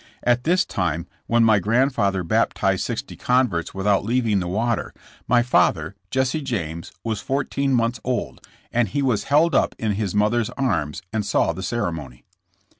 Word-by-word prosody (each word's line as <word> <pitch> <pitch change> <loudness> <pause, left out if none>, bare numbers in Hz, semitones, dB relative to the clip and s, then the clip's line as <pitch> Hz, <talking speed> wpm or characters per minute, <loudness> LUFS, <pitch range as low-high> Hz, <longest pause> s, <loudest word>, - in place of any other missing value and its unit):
At 120 +1 +2
this 180 +3 +3
time 85 -3 -2 0.2
when 115 0 +3
my 110 -2 +5
grandfather 105 -3 +1
baptized 85 - +1
sixty - - -4
converts 125 -11 0
without 100 +1 +2
leaving 115 -2 +1
the 90 - -3
water, 110 +5 -1 0.3
my 120 +1 +4
father, 90 -7 +2 0.2
Jesse 130 +5 0
James, 85 - -4
was 110 -2 -2
four 135 +1 0
teen 140 -1 0
months 115 0 0
old, 125 -2 -3 0.3
and 120 -1 +2
he 140 +9 -1
was 125 -6 +1
held 155 +4 +3
up - - +2
in 110 -2 -1
his 105 -1 -2
mother's 105 +2 +2
arms 95 - -1
and 110 -1 0
saw 100 - +1
the 95 - -7
ceremony. 80 - -4
110 Hz, 165 wpm, -22 LUFS, 95-125 Hz, 0.3 s, my